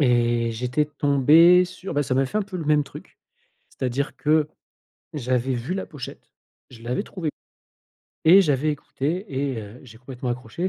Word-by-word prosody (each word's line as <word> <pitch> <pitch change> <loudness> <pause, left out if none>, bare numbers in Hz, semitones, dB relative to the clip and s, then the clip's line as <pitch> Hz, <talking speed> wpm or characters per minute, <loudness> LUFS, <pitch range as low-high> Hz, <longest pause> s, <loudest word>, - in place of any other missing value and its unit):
Et 120 -3 +2
j'étais 125 +6 0
tombé 150 +5 +5
sur, 185 +1 -8
bah, 145 -1 +1
ça 130 - -1
m'a 135 +1 +3
fait 175 +11 -2
un - - 0
peu 195 -2 -7
le 165 - -4
même 150 -1 +3
truc. - - -13 0.5
C'est-à-dire 130 +2 -3
que 155 0 +2 0.7
j'avais 130 -2 -1
vu 125 +9 -3
la 195 - -3
pochette, 145 -6 -10 0.4
je 115 -3 -14
l'avais 125 +2 -2
trouvée 165 -5 -4 1.0
et 180 +5 +8
j'avais 150 -1 +1
écouté 155 +6 -3
et 135 -3 -2
heu, 105 +4 -11
j'ai 115 -3 -14
complètement 125 0 -7
accroché. 125 +9 -3
140 Hz, 170 wpm, -23 LUFS, 125-160 Hz, 1.0 s, et